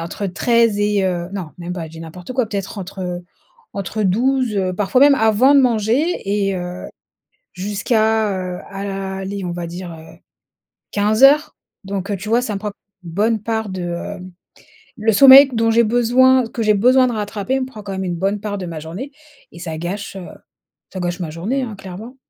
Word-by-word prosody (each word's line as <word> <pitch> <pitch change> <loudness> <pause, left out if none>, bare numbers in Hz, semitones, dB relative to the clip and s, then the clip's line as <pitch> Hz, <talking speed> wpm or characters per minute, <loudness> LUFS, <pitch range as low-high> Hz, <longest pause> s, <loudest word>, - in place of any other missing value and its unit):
entre 170 +4 -4
13 230 +3 +2
et 205 -1 +1
heu 175 -2 -2
non 185 -6 -5
même 175 +1 -5
pas 170 -3 -5
je 155 - -12
dis 165 - -10
n'importe 175 +6 -9
quoi, 255 -3 0
peut-être 200 0 -5
entre 180 -1 -5 0.5
entre 200 +2 -3
12 235 +2 +1 0.2
parfois 205 +5 +1
même 285 0 +7
avant 220 +5 +4
de 280 - +7
manger 235 +1 +2 0.2
et 195 -1 0
heu, 180 0 -6 0.7
jusqu'à, 215 +2 0 0.3
heu, - - -9
a 195 -1 -5
aller 195 0 -5
on 175 - -3
va 175 -1 -5
dire, 175 +1 -7
heu, 160 0 -13 0.7
15:00 250 +9 +4 0.3
donc 200 +1 -3
tu 210 +3 -7
vois, 235 +2 +3
ça 225 -4 -3
me - - -3
prend 210 0 -4 0.3
bonne 210 +6 0
part 220 0 -2
de, 185 -2 -5
hem 185 +1 -6 0.7
le 225 0 +2
sommeil 270 +4 +9
dont 225 -1 +2
j'ai 235 +1 +4
besoin 245 +3 +4
que 230 - -5
j'ai 215 -1 +4
besoin 255 +5 +4
de 245 - -2
rattraper 215 +4 -2
me 260 - -2
prend 220 -5 -10
quand 195 -1 -6
même 190 - -3
une 175 -1 -2
bonne 195 +4 -1
part 205 -1 -4
de 180 - -5
ma 165 -2 -6
journée 175 - -7 0.4
et - - -12
ça 165 -2 -5
gâche, 195 +4 -5
heu, 185 - -8 0.7
ça 185 - -5
gâche 175 0 -3
ma 165 - -3
journée, 220 - -2
hein, 225 -4 -6
clairement. 195 +7 -9
205 Hz, 190 wpm, -19 LUFS, 185-230 Hz, 0.7 s, sommeil